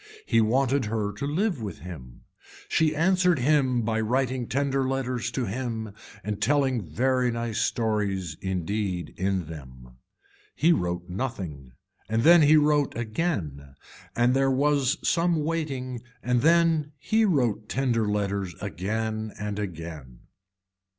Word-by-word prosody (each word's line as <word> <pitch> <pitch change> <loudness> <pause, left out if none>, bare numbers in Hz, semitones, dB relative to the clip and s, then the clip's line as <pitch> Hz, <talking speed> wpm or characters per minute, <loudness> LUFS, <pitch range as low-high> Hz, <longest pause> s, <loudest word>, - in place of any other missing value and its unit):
He 115 - +3
wanted 130 +3 +2
her 105 -1 -2
to 120 +8 -4
live 170 - 0
with 105 -2 -5
him. 65 -9 -10 0.5
She 155 -1 +2
answered 180 +1 +3
him 130 -3 +2
by 110 0 0
writing 125 +1 0
tender 135 0 0
letters 130 -3 -2
to 130 - -2
him 110 -1 -4 0.3
and 105 0 -4
telling 130 0 +2
very 125 - +1
nice 115 -2 -2
stories 100 -7 -1
indeed 95 0 -2
in 95 -1 -1
them. 65 -6 -11 0.6
He 170 +3 +4
wrote 90 - -2
nothing 90 - -5 0.4
and 110 +1 +1
then 170 +2 +8
he 155 +1 +6
wrote 150 -3 +2
again 105 - -3 0.4
and 120 +1 +3
there 135 0 +3
was 140 +1 +2
some 170 -2 +2
waiting 135 -7 -3 0.2
and 125 -1 +1
then 165 -2 +3
he 220 - +1
wrote 120 - +1
tender 120 -5 +1
letters 100 -3 -1
again 110 +3 -3
and 105 0 -3
again. 80 -10 -7
115 Hz, 130 wpm, -26 LUFS, 100-140 Hz, 0.6 s, then